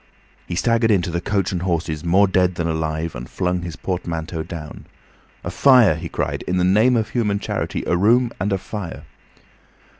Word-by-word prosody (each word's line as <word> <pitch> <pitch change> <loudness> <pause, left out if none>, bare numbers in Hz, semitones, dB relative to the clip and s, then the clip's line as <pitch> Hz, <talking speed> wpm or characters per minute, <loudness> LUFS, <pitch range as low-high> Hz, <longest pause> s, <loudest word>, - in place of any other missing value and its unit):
He 85 - -4
staggered 115 +4 +2
into 90 -5 +2
the 85 +1 -2
"Coach 100 0 -1
and 90 -2 -2
Horses" 85 -3 -2
more 95 +4 +4
dead 90 -1 +2
than 85 -1 -2
alive, 80 0 -2
and 60 +1 -8
flung 90 -1 -1
his 85 -1 -6
portmanteau 85 -3 -4
down. 80 -2 -8 0.6
"A 85 - -4
fire," 125 - +6
he 85 +1 -6
cried, - - -2
"in 90 - 0
the 90 - +2
name 110 +7 +4
of 110 - -1
human 105 -5 0
charity! 100 - -3
A - - +1
room 115 +6 +3
and 100 +3 -1
a 95 - +2
fire!" 95 -2 -7
90 Hz, 185 wpm, -21 LUFS, 85-105 Hz, 0.6 s, fire